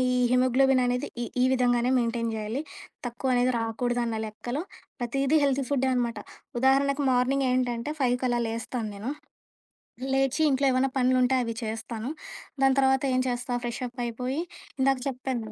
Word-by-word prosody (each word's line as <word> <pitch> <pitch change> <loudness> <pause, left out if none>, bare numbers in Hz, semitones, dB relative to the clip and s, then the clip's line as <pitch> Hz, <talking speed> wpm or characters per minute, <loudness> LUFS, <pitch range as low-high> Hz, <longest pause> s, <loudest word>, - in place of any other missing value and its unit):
ఈ - - +2
హిమోగ్లోబిన్ 255 +1 +4
అనేది 250 0 0 0.2
ఈ - - -2 0.2
ఈ - - +5
విధంగానే 245 -1 +2
మెయింటైన్ 230 -1 -1
చేయాలి. 220 +5 -3 0.5
తక్కువ 250 +2 -1
అనేది 245 +1 +3
రాకూడదు 240 +2 -1
అన్న 230 -1 -2
లెక్కలో 240 +7 -4 0.4
ప్రతీదీ 275 +5 +1
హెల్తీ 275 -1 +1
ఫుడ్డే 265 -2 +1
అనమాట. 240 -2 -1 0.4
ఉదాహరణకి 275 +2 +3
మార్నింగ్ 260 +2 +2
ఏంటంటే 250 +2 -1
5 250 -1 +3
కలా 240 -1 +1
లేస్తాను 230 0 -3
నేను. 215 +7 -4 1.0
లేచి 270 +2 +1
ఇంట్లో 275 +1 +2
ఏమన్నా 260 +1 +2
పనులుంటే 255 0 +3
అవి 230 -1 -4
చేస్తాను. 225 +3 -4 0.5
దాని 270 0 +4
తర్వాత 265 0 +3
ఏం 255 - +3
చేస్తా 245 0 -2
ఫ్రెష్ 240 +1 -4
అప్ 245 +1 -12
అయిపోయి 250 +6 -3 0.4
ఇందాక 270 0 +3
చెప్పాను. 250 -4 -4
250 Hz, 150 wpm, -27 LUFS, 235-265 Hz, 1.0 s, ఈ